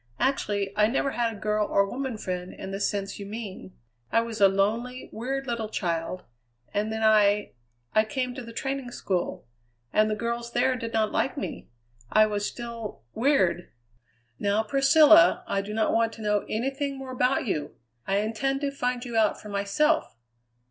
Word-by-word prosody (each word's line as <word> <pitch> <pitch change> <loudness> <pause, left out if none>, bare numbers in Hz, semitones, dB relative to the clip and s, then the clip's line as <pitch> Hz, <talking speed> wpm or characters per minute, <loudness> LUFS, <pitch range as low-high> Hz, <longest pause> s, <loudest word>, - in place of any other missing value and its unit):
Actually, 205 -7 0
I 210 0 +4
never 270 +3 0
had 235 -2 0
a - - -8
girl 210 0 0
or 200 - +3
woman 260 +1 -4
friend 180 -2 -4
in 190 - -7
the 195 - -4
sense 200 0 -2
you 200 - -6
mean. 205 -3 -7 0.4
I 230 - +4
was 230 -2 -5
a 195 - +9
lonely, 225 +6 -1
weird 270 +4 -3
little 235 -3 -3
child; 170 -2 -2 0.5
and 210 +2 0
then 220 0 -2
I 210 -1 +4 0.4
I 215 0 +4
came 255 +1 -2
to 265 - -6
the 230 -1 -9
training 270 +1 -3
school; 180 -3 -2 0.5
and 215 0 +4
the 215 - 0
girls 235 +1 -3
there 255 +2 +2
did 230 -2 -5
not 220 -1 +1
like 265 - 0
me 285 - -5 0.4
I 215 0 +6
was 205 -1 -1
still 235 - -7
weird 220 -9 +2 0.3
" 120 -1 -41
"Now, 205 +2 +1
Priscilla, 315 +8 +6
I 200 -11 0
do 200 +1 -7
not 220 0 +1
want 230 0 +2
to 225 - -9
know 210 -1 +1
anything 270 +4 -2
more 265 -1 -7
about 255 +1 +1
you! 150 -9 -2 0.3
I 195 - +2
intend 270 +6 -1
to 285 -1 -1
find 250 -2 -2
you 240 -2 -6
out 220 -2 +3
for 210 - -10
myself. 205 - +1
220 Hz, 185 wpm, -27 LUFS, 205-255 Hz, 0.5 s, a